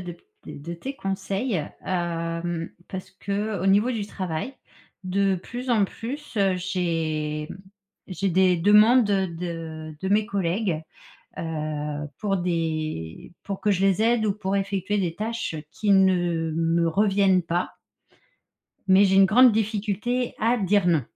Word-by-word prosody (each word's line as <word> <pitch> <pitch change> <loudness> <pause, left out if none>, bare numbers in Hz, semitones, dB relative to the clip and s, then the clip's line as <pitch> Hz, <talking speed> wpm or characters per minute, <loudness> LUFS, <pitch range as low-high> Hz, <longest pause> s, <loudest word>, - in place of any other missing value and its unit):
de 175 -1 -6
p 170 - -18 0.2
de 170 +4 -7
tes 265 +11 -6
conseils, 195 +2 -2 0.3
hem, 170 -1 -2 0.2
parce 185 -1 -7
qu'au 200 0 -3
niveau 205 +5 +4
du 220 -5 -3
travail, 185 +5 -4 0.5
de 195 +1 +1
plus 245 +8 -6
en 220 -4 +4
plus, 270 +6 -7
heu, 195 -2 +3
j'ai, 165 -4 -2
hem, - - -9 0.5
j'ai 190 +1 -2
des 185 0 +3
demandes, 210 +5 +6
heu, 195 -1 +2
de 165 -2 -6
de 190 - -2
mes 210 +2 +2
collègues, 185 -3 -1 0.6
heu, 150 -2 -3
pour 195 -2 0
des 155 - -3
pour 195 -1 -5
que 210 - +1
je 195 -1 +1
les 195 +1 +3
aide 230 0 +3
ou 205 - +2
pour 195 -1 -2
effectuer 195 0 -1
des 175 -4 -1
tâches 225 -1 -3 0.2
qui 210 +4 -2
ne 175 -4 +3
me 165 +1 +1
reviennent 195 0 +3
pas 175 +2 -2 1.1
mais 195 +1 +6
j'ai 190 - +3
une 195 - +8
grande 240 +5 +6
difficulté 220 +3 -1
à 235 +3 +2
dire 200 -1 +2
«non». 165 -5 +3
190 Hz, 145 wpm, -25 LUFS, 170-205 Hz, 1.1 s, une